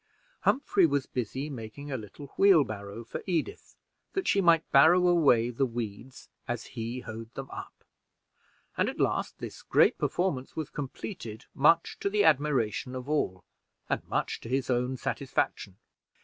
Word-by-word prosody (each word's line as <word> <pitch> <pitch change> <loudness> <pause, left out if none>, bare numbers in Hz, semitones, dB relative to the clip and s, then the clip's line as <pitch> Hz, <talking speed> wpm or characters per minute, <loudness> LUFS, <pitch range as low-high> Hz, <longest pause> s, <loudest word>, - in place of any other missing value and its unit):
Humphrey 200 -9 +3
was 140 -2 0
busy 130 +4 -3
making 140 +2 -8
a - - -1
little 130 +5 -9
wheelbarrow 115 - +3
for 115 - -6
Edith, 170 -5 -3 0.4
that 385 -1 -2
she 200 - +3
might 165 -3 +4
barrow 160 +6 +6
away 140 -9 +4
the 130 +3 0
weeds 120 +2 -6 0.2
as 120 -2 -3
he 120 +2 -4
hoed 115 -1 -8
them 135 0 -7
up; - - -9 0.9
and - - +1
at - - -7
last - - 0
this - - -8
great - - +3
performance 160 -8 -1
was 155 -2 -4
completed, 135 - -6
much 165 +4 +3
to 200 - 0
the 205 0 +2
admiration 130 - +2
of 130 +1 -6
all, 95 -12 -1 0.5
and - - +1
much - - -2
to 115 - -8
his 130 0 0
own 125 +1 0
satisfaction. 120 -8 -2
135 Hz, 150 wpm, -29 LUFS, 115-155 Hz, 0.9 s, barrow